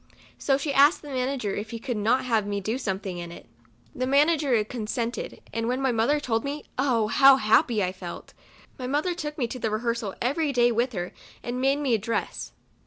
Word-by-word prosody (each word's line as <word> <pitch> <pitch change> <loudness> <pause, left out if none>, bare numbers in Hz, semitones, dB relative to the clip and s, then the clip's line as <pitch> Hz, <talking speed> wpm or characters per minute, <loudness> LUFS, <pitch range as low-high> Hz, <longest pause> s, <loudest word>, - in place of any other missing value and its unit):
So 270 -1 +2
she 280 0 -2
asked 285 +5 +5
the 295 - -9
manager 255 -5 -2
if 210 +2 -5
he 230 - -5
could 245 +1 -4
not 225 +5 +1
have 225 -4 +1
me 205 0 -1
do 220 +6 -2
something 190 -5 -3
in 170 -1 -7
it. 170 - -11 0.5
The 255 0 -2
manager 280 -4 +3
consented, 230 +1 -4
and 230 0 -1
when 250 +2 0
my 265 -1 +1
mother 240 +6 +2
told 225 -5 -1
me, 285 +2 -4
oh! 250 -5 +2
how 270 +4 +7
happy 225 -2 +3
I 180 - 0
felt. 180 -2 -9 0.5
My 250 - -4
mother 300 +7 0
took 300 -3 -5
me 260 - 0
to 255 - -6
the 225 - -1
rehearsal 225 -2 -2
every 285 +5 0
day 240 -1 +4
with 240 +2 0
her, 175 -2 -4 0.3
and 245 +1 -3
made 270 +1 +3
me 270 -4 +1
a 225 - +3
(Jress. 225 +3 -3
245 Hz, 210 wpm, -26 LUFS, 220-275 Hz, 0.5 s, how